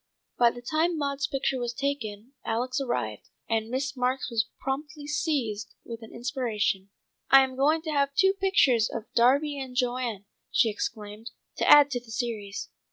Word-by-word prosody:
By 240 -1 +7
the 245 +1 -9
time 320 +5 +1
Maud's 280 -1 -1
picture 270 -1 -1
was 240 -1 -3
taken 255 -4 -3
Alex 250 +4 -1
arrived, 120 - -3 0.2
and 225 -1 0
Miss 265 +2 -2
Marks 255 0 -1
was 225 -1 +1
promptly 290 +3 -4
seized 270 -8 -2
with 230 -1 -7
an 225 - -11
inspiration. 235 -6 -1 0.4
"I 270 0 +8
am 260 -1 -3
going 305 +4 +2
to 315 - -3
have 280 -1 +1
two 385 +5 +4
pictures 330 - +3
of - - -4
Darby 280 +5 +3
and 260 -2 -7
Joan," 245 -5 -1 0.2
she 225 -3 +3
exclaimed, 210 +1 -5 0.3
"to - - +1
add 290 -1 +8
to 245 - -1
the 240 -1 -19
series. 220 -4 -4
255 Hz, 165 wpm, -27 LUFS, 225-280 Hz, 0.4 s, I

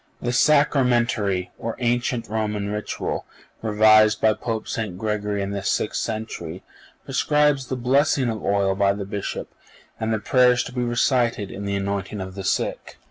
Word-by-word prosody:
(486) - - -13
The 125 +5 +3
Sacramentary, 120 -9 +1
or 115 - -4
ancient 120 -1 0
Roman 105 -1 -2
Ritual, 105 0 -3 0.4
revised 110 0 +5
by 110 -1 +4
Pope 110 0 -4
St. 105 -6 -3
Gregory 105 -1 -2
in 100 - -4
the 100 -1 -3
sixth 105 - -1
century, 105 -6 -5 0.4
prescribes 150 -3 +2
the 130 - -2
blessing 130 +1 +2
of 110 -3 -3
oil 100 -1 +2
by 100 0 +2
the 100 -1 -5
Bishop, 100 0 -5 0.5
and 110 0 -1
the 110 - +1
prayers 125 +2 +3
to 125 - -9
be 125 - -2
recited 120 -3 +1
in 100 - -6
the 100 0 -1
anointing 100 +1 -3
of 95 0 -6
the 95 0 -6
sick. - - -2
110 Hz, 165 wpm, -23 LUFS, 100-120 Hz, 0.5 s, revised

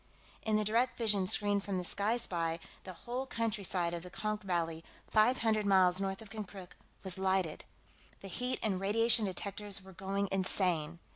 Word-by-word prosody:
In 220 -1 +1
the 215 0 +2
direct 235 +4 +2
vision 205 -5 +2
screen 205 +1 +3
from 200 -1 -3
the 180 - -2
Sky 205 +6 0
Spy, 165 -7 -1 0.3
the 185 - -7
whole 255 +3 -3
countryside 200 -7 -1
of 170 - -3
the 180 - -9
Konk 215 +2 -3
Valley, 165 -4 -2 0.2
five 220 +4 +4
hundred 215 -2 +2
miles 185 -1 +4
north 195 +2 -3
of 205 - -15
Konkrook, 200 -4 -7 0.3
was 190 -1 -2
lighted. 190 -4 0 0.6
The 195 - -8
heat 250 +7 -1
and 200 -4 +1
radiation 225 +3 +4
detectors 200 +1 -2
were 190 0 -13
going 195 +2 -2
insane. 180 -4 +1
195 Hz, 170 wpm, -33 LUFS, 185-215 Hz, 0.6 s, five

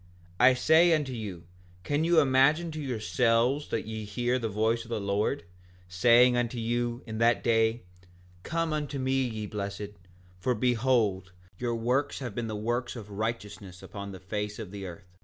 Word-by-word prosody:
5:16 125 - +6
I 130 - +7
say 160 +5 +5
unto 145 -4 -2
you, 100 -7 -6 0.4
can 145 +2 0
you 170 0 +5
imagine 145 +4 +3
to 155 0 -5
yourselves 125 +1 +1
that - - -2
ye 110 0 -5
hear 120 +4 -1
the 115 -2 -2
voice 110 +3 0
of 115 - -15
the 115 -2 -2
Lord, 100 +7 -1 0.4
saying 120 +7 +5
unto 120 0 -1
you, 120 +1 -2
in 110 -1 -5
that 115 +1 +3
day: 115 0 +2 0.6
Come 165 - -1
unto 150 -2 -3
me 135 0 +1
ye 110 -4 -3
blessed, 100 0 -5 0.5
for 125 +7 0
behold, 110 -6 +1 0.3
your 120 -1 -1
works 125 +5 0
have 125 -5 -5
been 115 +2 -3
the 110 - -4
works 120 +4 -2
of 105 -3 -9
righteousness 105 -3 -5
upon 100 -1 -7
the 95 - -9
face 105 +3 -4
of 105 -5 -7
the 100 -2 -6
earth? 90 +1 -13
115 Hz, 175 wpm, -28 LUFS, 105-130 Hz, 0.6 s, I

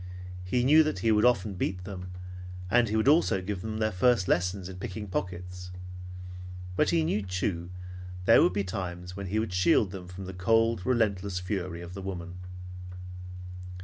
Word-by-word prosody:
He 120 +7 +1
knew 150 +5 +8
that 155 0 +1
he 115 - +6
would 105 +1 +5
often 110 -4 +3
beat 90 0 -2
them, 90 -2 -6 0.6
and 120 -1 +5
he 110 - 0
would 110 +3 +2
also 150 - +5
give 95 0 -3
them 110 +1 -3
their 110 0 +1
first 105 +1 +3
lessons 90 +1 +1
in 95 -1 -7
picking 105 +3 -5
pockets; 90 -1 -4 1.1
but 150 - +3
he 165 -1 +3
knew, 130 -9 +1
too, 90 -2 -2
that 90 0 -10
there - - +8
would 90 - +4
be 100 - +1
times 90 -2 -4
when 100 -1 -4
he 100 +4 -1
would 110 -4 0
shield 90 +2 +4
them 95 -2 -7
from 95 +1 -7
the 95 - -6
cold, 115 +3 +2
relentless 100 -6 +2
fury 90 -2 -3
of 85 +1 -8
the 100 - -6
woman. 90 -2 -5
95 Hz, 180 wpm, -29 LUFS, 90-110 Hz, 1.1 s, knew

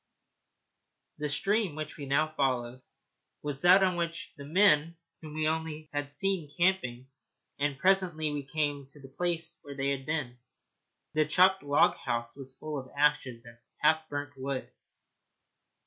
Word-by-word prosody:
The 150 0 -1
stream 195 +3 +1
which 155 -1 -5
we 140 -2 -7
now 155 +3 +1
followed 130 -3 -1 0.6
was 145 -2 -3
that 185 +2 +7
on 185 -2 +2
which 170 -1 -3
the 140 - -10
men 165 -1 +4 0.2
whom 155 -1 -9
we 155 0 -2
had 145 -1 -2
seen 190 +2 0
were 145 - -21
camping, 170 -10 +1 0.5
and 145 -1 0
presently 175 -3 +2
we 145 -1 -2
came 145 -1 -2
to 145 +2 -14
the 135 -1 -12
place 170 -1 -1
where 140 -1 -9
they 135 0 -1
had 135 0 -4
been. 140 -6 -2 0.7
The 155 0 +3
chopped 185 +5 +4
log 145 0 +3
house 120 -2 -3
was 135 -1 -10
a - - -28
pile 155 -2 -4
of 130 - -10
ashes 135 -5 +1
and 115 0 -14 0.2
half 155 +1 +3
burnt 145 -1 -4
wood. 135 0 -4
150 Hz, 160 wpm, -30 LUFS, 140-165 Hz, 0.7 s, that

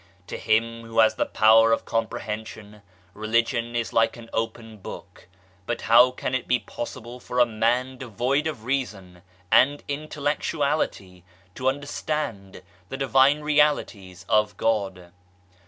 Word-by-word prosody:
To - - -7
him 115 +1 0
who 115 0 -9
has 110 -1 +5
the - - -1
power 115 +1 +5
of 115 - +1
comprehension 105 -1 -5 0.3
Religion 115 +3 -1
is 115 -1 -2
like 115 +1 +2
an 115 -1 -13
open 115 -1 -4
book, 95 - -11 0.4
but 120 - -2
how 120 +3 +6
can 125 0 -5
it 130 - -2
be 125 - +3
possible 120 0 -8
for 125 - -7
a 120 - +7
man 120 +3 0
devoid 130 +5 -1
of 135 -9 -5
reason 105 -9 -4 0.3
and 145 +3 +4
intellectuality 145 - -2 0.3
to 130 +5 0
under 145 +2 -4
stand 115 -13 -4 0.3
the 135 - -5
Divine 135 +2 +3
Realities 145 - 0
of 105 -1 +1
God 95 -5 -1
115 Hz, 140 wpm, -24 LUFS, 110-130 Hz, 0.4 s, a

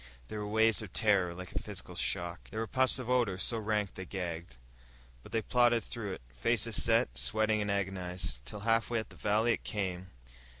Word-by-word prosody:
There 110 - -4
were 105 - -3
waves 110 +1 +4
of 105 -5 -8
terror 95 -5 +3
like 90 0 -7
a - - -2
physical - - -6
shock. 85 0 -2
There 110 - -4
were 115 - 0
puffs 130 +3 +2
of 130 -3 -4
ordure, 120 -7 +2
so 115 +5 0
rank 105 -2 0
they 95 - -6
gagged. 85 -7 -5 0.6
But - - -14
they 115 -1 0
plodded 120 -1 +3
through 110 -5 -4
it, - - -8
faces - - +2
set, 60 - +3
sweating 110 - +2
and 105 - -1
agonized. 90 -8 -2
Till, 65 +11 -7
halfway 115 +1 +2
up 110 - -6
the - - -13
valley 110 +3 +2
it - - -4
came.... 95 -3 -3
105 Hz, 200 wpm, -32 LUFS, 90-110 Hz, 0.6 s, waves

